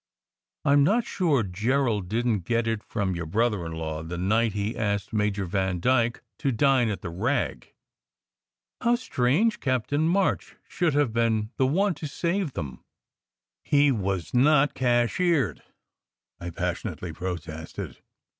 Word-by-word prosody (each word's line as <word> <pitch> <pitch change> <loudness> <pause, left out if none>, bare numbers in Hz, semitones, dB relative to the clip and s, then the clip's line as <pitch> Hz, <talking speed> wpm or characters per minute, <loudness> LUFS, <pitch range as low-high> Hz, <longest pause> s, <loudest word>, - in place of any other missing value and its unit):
I 140 - +4
m 145 0 +6
not 220 +9 +2
sure 155 - +1
Gerald 105 +1 0
didn 115 0 +1
t 85 - -25
get 115 0 +1
it 115 -2 -1
from 100 -3 -2
your 85 -2 -4
brother 105 -2 0
in 80 - -6
law 80 -1 -4
the 85 +2 -6
night 110 +4 +1
he 105 +3 -2
asked 100 -1 -2
Major 105 -2 0
Van 95 0 -1
dyke 120 +2 +1 0.2
to 140 -3 +1
dine 130 -1 +3
at 105 - -4
the 85 - -4
Rag. 115 +12 -2 1.1
How 240 0 +3
strange 210 - +1
Captain 140 +4 0
March 190 +3 0
should 165 -5 0
have 145 -6 +2
been 110 -2 +1
the 130 - +3
one 190 +7 +2
to 150 0 -6
save 170 +1 -1
them! 70 -6 -6 0.4
" - - -66 0.3
"He 145 -1 +4
was 95 -6 -2
not 145 +3 +4
cashiered," 125 - +1 0.8
I 85 - -5
passionately 85 0 -4
protested. 80 -3 -6
115 Hz, 150 wpm, -26 LUFS, 95-145 Hz, 1.1 s, m